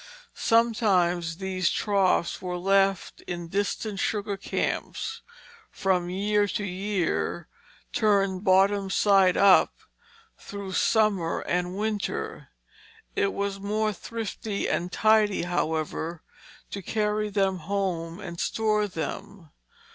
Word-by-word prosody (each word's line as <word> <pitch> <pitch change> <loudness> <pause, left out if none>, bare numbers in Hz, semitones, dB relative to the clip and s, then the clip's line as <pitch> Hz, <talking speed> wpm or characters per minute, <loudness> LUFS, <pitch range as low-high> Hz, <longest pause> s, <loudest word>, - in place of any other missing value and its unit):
Sometimes 185 -8 +2
these 185 -2 0
troughs 195 -4 +1
were 180 -1 -3
left 195 0 +1
in 175 -1 -5
distant 200 +1 -2
sugar 205 0 -1
camps 445 - -3 0.5
from 180 -3 0
year 205 +2 +1
to 205 - -3
year, 190 -1 -2 0.5
turned 195 -3 +2
bottom 195 0 +3
side 195 -2 +4
up, 195 -2 +5 0.6
through 200 -1 -7
the - - -6
summer 205 -7 +2
and 180 +1 -2
winter. 210 -1 -3 0.7
It 200 - +1
was 200 0 -3
more 215 +2 0
thrifty 220 0 -4
and 175 +1 -1
tidy, 215 -2 +3
however, 160 -1 -2 0.5
to 200 - -5
carry 210 +2 -1
them 195 -2 +1
home 175 -1 -2
and 175 -4 -7
store 215 -1 +1
them. 185 -1 -6
195 Hz, 110 wpm, -26 LUFS, 180-210 Hz, 0.7 s, up